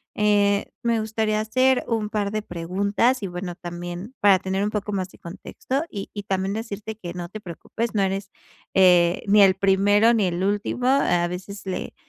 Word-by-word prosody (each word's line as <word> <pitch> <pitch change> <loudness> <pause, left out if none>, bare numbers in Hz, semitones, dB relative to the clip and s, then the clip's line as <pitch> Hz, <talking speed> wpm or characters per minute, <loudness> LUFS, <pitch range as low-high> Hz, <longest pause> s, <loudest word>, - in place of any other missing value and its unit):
eh, 205 -1 +2 0.2
me 235 -1 +1
gustaría 220 0 -1
hacer 255 +4 +2
un 220 -3 -1
par 205 -1 -1
de 215 0 -3
preguntas 200 +8 0
y - - -1
bueno 180 0 -6
también 175 +5 -7
para 200 -2 +6
tener 190 +1 -2
un 205 - 0
poco 210 -1 -3
más 190 -2 -2
de - - -18
contexto 205 - -4
y 200 -2 -6
y 205 - -6
también 195 0 -1
decirte 220 -1 -5
que 175 -5 -7
no 175 -1 -6
te 215 - -8
preocupes, 215 +6 -5
no 205 - +2
eres, 195 +1 -2 0.5
eh, 180 -2 +5
ni 205 +1 +6
el 190 -1 +5
primero 200 +4 +4
ni 220 -4 +2
el 175 +1 -2
último, 205 +5 -1
a 220 -11 +3
veces 190 +3 -7
le, 185 - -4
200 Hz, 190 wpm, -23 LUFS, 185-215 Hz, 0.5 s, para